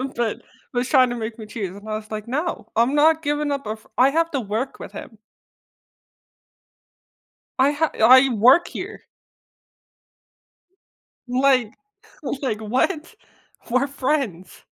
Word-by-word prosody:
But 230 -2 -2 0.3
was 245 +1 -1
trying 255 -4 +5
to 245 - -3
make 225 0 -6
me 215 - -7
choose 200 -4 -6
and 205 +2 -12
I 215 - -2
was 215 0 -8
like, 215 0 -5
"No, 300 +8 -3
I'm 235 +4 +2
not 315 +2 +4
giving 295 0 -1
up 280 -3 -3
a 215 - -3
fr 215 - -22
I 260 +2 +5
have 330 +3 0
to 275 - -1
work 225 +5 -4
with - - -9
him." 220 - -10 2.4
I 275 +2 +4
ha 300 +2 0
I 260 +4 +7
work 250 +9 +5
here. - - -8 2.2
Like 255 -2 +2 0.7
like, 220 -5 -2
what? 260 - -1 0.6
We're 255 +3 +2
friends. 260 - -3
255 Hz, 140 wpm, -22 LUFS, 220-280 Hz, 2.4 s, I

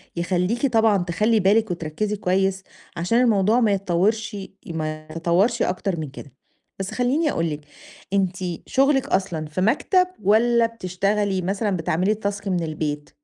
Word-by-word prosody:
يخلّيكِ 180 +8 0
طبعًا 225 -4 +3
تخلّي 210 +6 +1
بالِك 205 +1 +3
وتركزي 175 +6 -2
كويس 190 0 0 0.3
عشان 230 +9 +2
الموضوع 220 0 +3
ما 220 -4 +3
يتطورش 200 +3 0 0.3
ما 155 -2 -4
يتطورش 175 +9 +1
أكتر 180 -1 -1
من 150 -3 -4
كده، 140 0 -11 0.5
بس 195 0 -4
خلّيني 280 +5 +1
أقول 165 0 -1
لِك 150 0 -5 0.5
أنتِ 190 -2 +1 0.3
شغلِك 270 0 +2
أصلًا 175 -5 -1
في 155 +4 -4
مكتب 360 - +3 0.2
والّا 230 +4 +4
بتشتغلي 200 -2 -1
مثلًا 200 +3 -1
بتعملي 175 +5 +1
الtask 200 -1 -4
من 180 -3 0
البيت؟ 150 -2 -3
195 Hz, 140 wpm, -23 LUFS, 170-220 Hz, 0.5 s, والّا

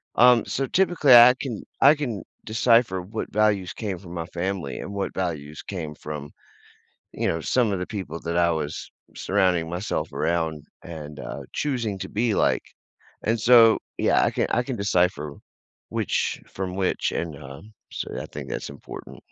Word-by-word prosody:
Um, 120 -1 +6
so 135 - -1
typically, 175 -5 +4
I 120 +1 +10
can 120 -7 -4 0.2
I 145 +3 +8
can 125 -9 -4 0.2
decipher 115 -3 +3
what 105 +5 -6
values 105 -3 +2
came 100 -5 -4
from 85 -3 -11
my 85 -2 -4
family 90 -4 -3
and - - -6
what 100 -1 -3
values 75 -5 -4
came 80 -6 -5
from, 75 -1 -7 0.8
you - - -1
know, 80 - -1
some 115 +4 +1
of 95 - -1
the 90 - -3
people 95 -7 -5
that 85 +1 -3
I 85 0 +4
was 75 -2 -3 0.3
surrounding 90 -3 +1
myself 90 +5 -3
around 80 -3 -1 0.2
and, 75 -3 -8
uh, - - -6
choosing 120 -9 -2
to - - -4
be 110 0 0
like, - - +2 0.6
and 115 +2 +1
so, 115 -1 +7 0.2
yeah, - - +3
I - - +2
can - - 0
I 120 - +2
can 130 0 -4
decipher 90 -7 +1 0.6
which - - -1
from 95 -1 -4
which 95 -1 0
and, 80 -4 -3
uh, 70 -1 -10 0.3
so - - -5
I - - -5
think - - -8
that's - - -4
important. 70 - -10
95 Hz, 170 wpm, -24 LUFS, 85-115 Hz, 0.8 s, I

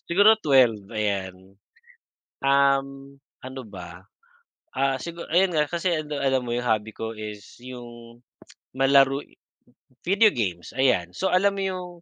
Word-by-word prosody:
Siguro 205 +5 +6
12, 125 -8 +3
ayan. 95 -3 -4 0.9
Um, 135 0 +1 0.3
ano 130 +1 -7
ba, 90 -2 -11 0.7
ah, 135 0 +1
siguro, 170 +3 -7
ayun 180 +1 +3
nga 150 -1 +2
kasi 175 +1 -1
ano 150 -1 -5
alam 135 -2 +1
mo 120 - -5
yung 125 - -3
hobby 110 -1 0
ko 115 0 -5
is 105 -1 -9
yung 120 -2 -11 0.6
malaro, 135 +1 +4 0.8
video 200 +3 +4
games 90 -7 -4
ayan. 110 -10 +2
So 190 - -1
alam 200 +2 +3
mo 195 - -3
yung 185 -2 -3
135 Hz, 135 wpm, -24 LUFS, 110-155 Hz, 0.9 s, Siguro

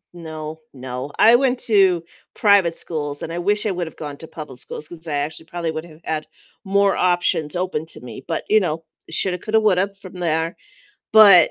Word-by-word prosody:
No, 160 -2 -7 0.2
no. 130 +1 -6
I 230 +2 +8
went 255 -1 +1
to 190 -6 +3 0.3
private 200 -5 +4
schools, 145 -3 -4
and 165 - -4
I 170 - -3
wish 205 +4 +1
I 215 - +1
would've 175 -3 -3
gone 145 -2 -6
to 160 - -10
public 150 -6 -9
schools 150 +3 -8
'cause 170 -1 -9
I 155 - -3
actually 150 +3 -3
probably 170 -1 -3
would 160 0 -5
have 160 -2 -15
had 155 -1 -3 0.4
more 200 0 +3
options 175 -4 +1
open 180 -3 -2
to - - -9
me. 125 +1 -9
But, 165 - -2
you 215 - +6
know, 165 -5 -2 0.2
shoulda, 180 +3 -1
coulda, 220 +4 +1
woulda 200 -2 +2
from 185 - -10
there. 165 -1 -1 0.6
But, 200 -6 +9
170 Hz, 195 wpm, -21 LUFS, 155-195 Hz, 0.6 s, But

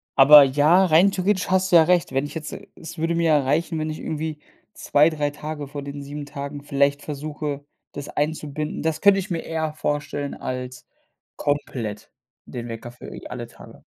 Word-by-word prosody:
aber 145 +2 +10
ja, 150 +7 +4
rein 180 +3 +5
theoretisch 190 0 0
hast 190 0 +2
du - - +8
ja 165 - +9
recht, 175 -4 +2
wenn 135 +2 +1
ich 145 - -8
jetzt 160 -2 -6 0.2
es 165 - -10
würde 165 +1 0
mir 170 0 +1
ja 155 -2 +5
reichen, 160 +5 0
wenn 155 0 -2
ich 155 - -5
irgendwie 155 0 -4 0.3
2, 150 +2 +3
3 150 -2 -2
Tage 150 0 -6
von 145 0 -7
den 140 0 -7
7 145 +1 -7
Tagen 140 0 -7
vielleicht 140 0 +1
versuche, 145 -1 -5 0.3
das 140 - -7
einzubinden. 150 0 -3
Das 160 -1 -1
könnte 200 -1 +6
ich 190 - -5
mir 170 - -1
eher 160 -1 -3
vorstellen 145 -1 -3
als 125 0 -6 0.5
komplett 125 -8 -3 0.4
den 120 -1 -7
Wecker 115 +1 -7
für, 125 - -11
äh, - - -9
alle 120 -2 -6
Tage. - - -15
150 Hz, 190 wpm, -23 LUFS, 140-160 Hz, 0.5 s, aber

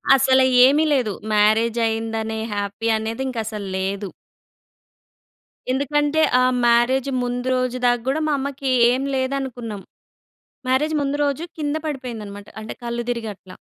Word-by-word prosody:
అసల 265 0 +4 0.2
ఏమి 290 +4 +4
లేదు. 235 -7 +1 0.2
మ్యారేజైదనే 225 +1 +1
హ్యాపీ 205 +2 -3
అనేది 225 +4 -3
ఇంక 255 -3 -5
అసలు 210 -2 -5
లేదు. 195 +1 -3 1.6
ఎందుకంటే 295 +3 +1 0.2
ఆ - - +4 0.2
మ్యారేజ్ 240 +3 +3
ముందు 245 +1 -3
రోజు 255 0 -1
దాకా 245 -1 +3
కూడా 315 +3 0
మా 300 - +1
అమ్మకి 275 -1 -3 0.2
ఏం 260 +2 0
లేదనుకున్నాం. 260 -6 -3 0.9
మ్యారేజ్ 300 +5 +2
ముందు 280 +1 -1
రోజు 285 +3 -1 0.2
కింద 295 0 -1
పడిపోయిందనమాట 220 -8 -6
అంటే 215 - -6
కళ్ళు 235 0 -3
తిరిగి 235 -2 -2
అట్లా. 185 0 -15
245 Hz, 125 wpm, -21 LUFS, 220-270 Hz, 1.6 s, అసల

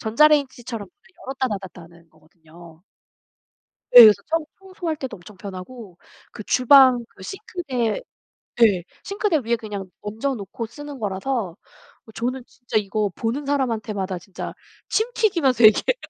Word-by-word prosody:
전자레인지처럼 245 -2 +1
문을 385 0 -28
열었다 265 -1 -2
닫았다 190 -4 -7
하는 170 0 -18
거거든요. 160 +1 -18 1.1
네. 245 - +12
그래서 215 -2 +7
청 325 -1 0
청소할 370 -4 -5
때도 265 -3 -6
엄청 190 +3 -15
편하고 190 +1 -10 0.3
그 - - -8
주방 255 -1 +5
그 - - -16
싱크대 320 - -3 0.6
예. 195 -6 +4 0.2
싱크대 400 -3 0
위에 235 +1 +1
그냥 205 -4 -7
얹어 225 +7 -3
놓고 215 +2 -6
쓰는 290 +2 -10
거라서 200 -2 -3 0.5
어 220 - -14
저는 250 +3 -3
진짜 245 -4 -4
이거 210 0 -1
보는 245 +6 -3
사람한테마다 215 -9 -2
진짜 180 +1 -8 0.4
침 440 - +1
튀기면서 300 - +2
얘기해요. 220 - +5
230 Hz, 320 characters per minute, -22 LUFS, 195-275 Hz, 1.1 s, 네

